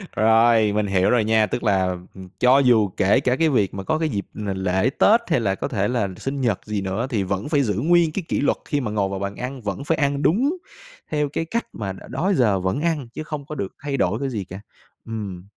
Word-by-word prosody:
Rồi, 110 -1 +4
mình 105 -1 0
hiểu 95 -1 +2
rồi 120 -3 +3
nha, 110 0 +3
tức 120 - -3
là, 95 -3 +2 0.3
ừm, 95 -1 -11
cho 130 +2 +5
dù 115 -6 +4
kể 100 +5 +4
cả 125 -1 +1
cái 160 +1 +2
việc 105 -8 +1
mà 95 - -5
có 155 - 0
cái 160 -1 0
dịp 100 -5 -3
là 105 -2 -4
l - - -6
lễ 95 +5 +1
Tết 230 +3 +5
hay - - +3
là 100 -4 0
có - - -3
thể 105 -4 -1
là 120 -5 0
sinh 135 0 -4
nhật 115 -6 +1
gì 105 -2 -2
nữa 100 +6 -2
thì 105 -5 0
vẫn 100 +8 -3
phải 145 -3 +3
giữ 105 -4 0
nguyên 165 - +3
cái 185 +3 -3
kỷ - - -1
luật 145 - +1
khi 145 -1 -1
mà 110 -4 -3
ngồi 100 -2 0
vào 95 -1 -4
bàn 100 0 -4
ăn, 130 +1 -6
vẫn 100 +1 -4
phải 160 +2 0
ăn 140 -1 0
đúng 270 - +2 0.5
theo 150 -1 0
cái 165 +3 -3
cách 235 +7 -2
mà 100 -3 -4
đ - - -12
đó 160 +11 0
giờ 105 -6 +3
vẫn 95 +11 -1
ăn 160 -6 -1
chứ 155 - -5
không 150 -2 -6
có 155 - -7
được 100 -8 -5
thay 140 -2 -2
đổi 100 -1 0
cái 140 - -2
gì 110 -6 -3
cả, 95 +2 -9 0.5
ừm. 100 -6 -6
115 Hz, 260 wpm, -22 LUFS, 100-140 Hz, 0.5 s, cho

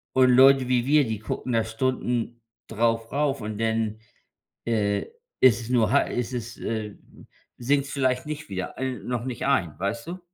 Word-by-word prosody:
Und 130 -1 +5
Leute 130 +1 +6
wie 125 -1 +1
wir, 145 -1 +4
die 110 -2 -3
gucken 120 +3 -4
da 115 -1 +2
Stunden 120 0 -2 0.3
darauf 115 +6 0
und 105 -1 -5
denn, 110 -1 -1 0.7
äh, 105 -3 0 0.3
ist 120 -3 +6
es 115 - -8
nur 115 -4 +3
ha 140 - +5
ist 125 0 -3
es, 115 -1 -5
äh 110 -2 -4 0.6
sinkt's 140 +3 0
vielleicht 130 -2 0
nicht 150 -3 -6
wieder 95 -2 -5
äh, 130 -1 -2
noch 125 -1 -3
nicht 125 -2 -4
ein, 85 - +1
weißt 115 - -3
du? 180 +1 -6
120 Hz, 170 wpm, -25 LUFS, 110-130 Hz, 0.7 s, Leute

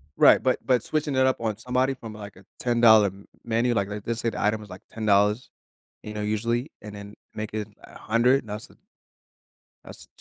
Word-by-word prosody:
Right. - - +6
But - - +1
but 125 -3 +2
switching 150 -3 -2
it 130 - +4
up 130 - +1
on 110 -3 -2
somebody 125 +3 0
from, 115 -4 -9
like, 105 -2 -10
a 95 +1 -17
$10 115 -4 +5 0.3
menu, 120 +1 +1
like, 100 -3 0
let's 105 +3 -4
say 115 - 0
the - - -5
item 105 +1 +1
was, 105 - -12 0.2
$10, 105 +1 +2 0.5
you 105 - -7
know, 105 - -4
usually, 115 +6 -1
and 105 -1 -9
then 100 0 -10 0.2
make 110 0 -5
it 105 -1 -3 0.2
a - - -13
100. 120 +3 +2
That's 105 +1 -6 1.2
That's - - -12
110 Hz, 180 wpm, -25 LUFS, 105-120 Hz, 1.2 s, Right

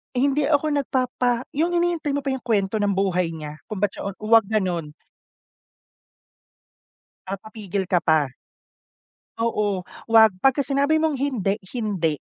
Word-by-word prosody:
"Hindi 280 +2 +2
ako 300 0 +2
nagpapa" 255 -3 0
yung 345 +2 +2
hinihintay 345 -4 0
mo 285 - -2
pa 275 - -1
yung 265 - -5
kwento 215 -2 0
ng 205 -1 +1
buhay 180 -3 +1
niya, 150 -1 -8
kung 215 - -5
ba't 205 - +2
siya - - -6
o - - -2
huwag 220 -1 +5
ganon. 180 -8 -1 2.3
Papapigil 195 -1 -5
ka 180 - +4
pa. 160 -5 +2 1.1
Oo, 210 -5 -1 0.2
’wag, 220 -2 +7
pagka 270 +3 +3
sinabi 280 +3 +2
mong 310 -4 0
hindi, 220 -7 -1 0.2
hindi. 190 -9 0
220 Hz, 135 wpm, -23 LUFS, 190-275 Hz, 2.3 s, wag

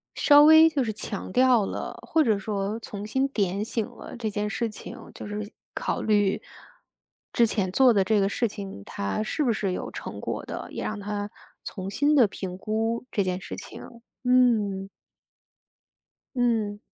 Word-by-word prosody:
稍 290 0 +7
微 315 +1 +8
就 280 -4 0
是 220 -2 -2
强 205 -2 -5
调 250 -2 +4
了， - - -5
或 320 -1 +3
者 220 -5 +2
说 200 +2 -3
重 205 -2 -7
新 265 +5 +1
点 200 -4 -1
醒 225 0 -2
了 - - -10
这 220 -2 -2
件 210 +1 -2
事 230 +1 -1
情。 210 - -9 0.2
就 - - -8
是 210 0 -5 0.2
考 - - -2
虑 205 -2 +2 0.9
之 235 -1 +4
前 190 -4 -1
做 255 +2 +5
的 195 - +3
这 210 +2 +2
个 195 0 +2
事 235 +3 0
情， 195 - -8
它 100 - -2
是 300 +7 -1
不 245 - +2
是 200 -3 -1
有 - - -4
成 - - -7
果 - - -4
的， - - -6
也 - - -5
让 215 -1 -3
他 205 0 -4 0.3
重 190 -2 -6
新 290 +9 +2
地 250 -6 +6
评 185 -2 -6
估 225 +4 -2
这 200 - +1
件 185 0 -2
事 - - -6
情， - - -9 0.4
嗯。 220 -6 +3 1.5
嗯。 220 -4 0
215 Hz, 190 characters per minute, -26 LUFS, 200-240 Hz, 1.5 s, 微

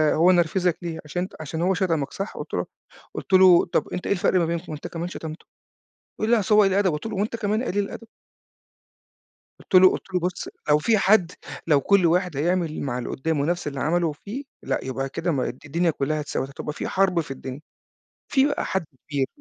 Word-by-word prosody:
هو 175 +3 +5
نرفِزك 175 0 +2
ليه؟ 170 -2 -5
عشان 175 +4 -3
ان - - -4
عشان 160 +1 -4
هو 185 +2 +2
شتمك 170 -7 0
صح؟" 195 +2 -5
قُلت - - -7
له - - 0 0.5
قُلت - - -6
له: 185 -2 +7
"طب - - 0
أنت 180 - -4
إيه - - +3
الفرق 185 -1 +2
ما 170 - +2
بينكم؟ 170 +1 -3
ما 155 - -5
أنت 150 - -7
كمان 170 +1 -4
شتمته!" 160 -3 -8 0.7
يقول 215 - -1
لي: 235 - +5
"أصل 210 +1 +2
هو 210 - +7
قليل 195 -1 +3
الأدب،" 195 -2 +2
قُلت 150 +7 -4
له: 220 - -4
"وأنت 210 +4 -1
كمان 215 0 0
قليل 205 -4 0
الأدب." 230 +3 -8 1.5
قُلت - - -3
له 185 0 +9
قُلت 190 - -6
له: 180 - +2
"بُصّ 180 +1 -3 0.2
لو 150 - +6
في 220 +8 +3
حد 195 -3 +4 0.4
لو 145 -3 +4
كُل 200 +1 +4
واحد 175 -2 +1
هيعمل 170 +1 0
مع 130 -3 -2
اللي 125 - -4
قُدّامه 145 0 -1
نفس 175 0 -1
اللي 140 -2 -4
عمله 170 +2 +1
فيه 210 - -7 0.2
لأ، - - -1
يبقى 135 +1 -3
كده 165 +5 -2
ما 135 -5 0
الد 125 - -9
الدنيا 165 +3 +1
كُلّها 155 +1 -1
اتساوت، 145 -2 -3
هتبقى 145 +2 -6
في - - -4
حرب 190 -2 +2
في 155 -4 -4
الدنيا. 135 +1 -7 0.7
في 270 0 +3
بقى 290 - -1
حد 190 -2 -1 0.3
بي" 140 -2 +1
175 Hz, 220 wpm, -24 LUFS, 150-190 Hz, 1.5 s, له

